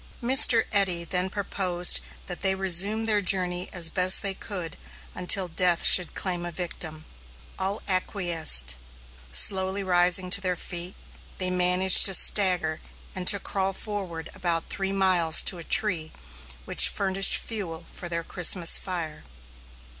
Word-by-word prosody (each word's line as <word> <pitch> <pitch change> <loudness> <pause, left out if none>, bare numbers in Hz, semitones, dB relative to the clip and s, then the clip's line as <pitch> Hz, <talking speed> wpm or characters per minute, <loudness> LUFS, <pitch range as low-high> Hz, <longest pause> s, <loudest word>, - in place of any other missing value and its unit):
Mr. 240 -2 +3
Eddy 190 -4 -2
then 180 +2 -4
proposed 185 -3 0 0.3
that 180 - -10
they 190 0 -2
resume 195 +4 +2
their 210 -2 -1
journey 180 -1 -1
as 175 -3 +2
best 185 0 +2
they 195 -1 -1
could 185 -5 -8 0.4
until 185 +1 0
death 175 0 -1
should 180 -3 +3
claim 180 -2 -6
a 175 - -7
victim. 160 -2 -7 0.5
All 195 +2 -5
acquiesced. 175 - 0 0.6
Slowly 190 - +4
rising 180 0 0
to 200 - +3
their 185 -1 -3
feet, 175 +1 -8 0.4
they 185 -1 0
managed 180 +1 +5
to 195 - 0
stagger 180 -7 +1 0.3
and 185 -1 -9
to 200 - +7
crawl 195 0 -4
forward 190 -6 -8
about 170 -2 -5
three 195 -1 -4
miles 185 -5 +2
to 180 - +1
a - - -9
tree 170 -5 0 0.5
which - - +5
furnished 195 0 +3
fuel 175 -7 -7
for 175 - -8
their 170 0 -6
Christmas 175 0 +2
fire. 165 - -8
185 Hz, 140 wpm, -23 LUFS, 175-195 Hz, 0.6 s, to